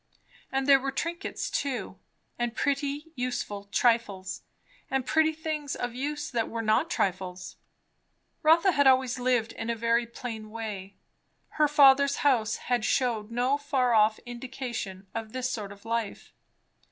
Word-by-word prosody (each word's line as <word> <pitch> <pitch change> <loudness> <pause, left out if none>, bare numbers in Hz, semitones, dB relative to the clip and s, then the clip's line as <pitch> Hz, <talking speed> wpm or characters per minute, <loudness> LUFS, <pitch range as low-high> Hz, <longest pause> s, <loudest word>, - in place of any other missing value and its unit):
And 270 0 0
there 275 -1 +7
were 270 +1 -2
trinkets 335 +5 -3
too, 275 -3 -3 0.4
and 240 -1 -1
pretty 285 +2 -1
useful 245 -6 -3
trifles, 200 -3 0 0.5
and 265 -1 0
pretty 315 +2 +3
things 310 -2 -4
of 245 -1 -3
use 295 +4 -3
that 230 -3 -1
were 225 0 -3
not 220 +9 +2
trifles. 185 - -2 0.9
Rotha 335 +5 +5
had 285 -4 +3
always 260 -1 +3
lived 245 -2 +1
in 225 - -5
a 235 - 0
very 230 +1 +1
plain 225 -2 -7
way; 210 -3 -6 0.5
her 305 -1 +2
father's 280 -1 +6
house 240 -6 +3 0.2
had 240 -3 +2
shewed 230 -4 0
no 250 +4 +1
far 265 -4 +1
off 215 0 +4
indication 240 -6 -6
of 225 -1 -5
this 255 0 -2
sort 205 -3 -4
of 200 +1 -14
life. 230 -2 -3
245 Hz, 145 wpm, -28 LUFS, 225-280 Hz, 0.9 s, there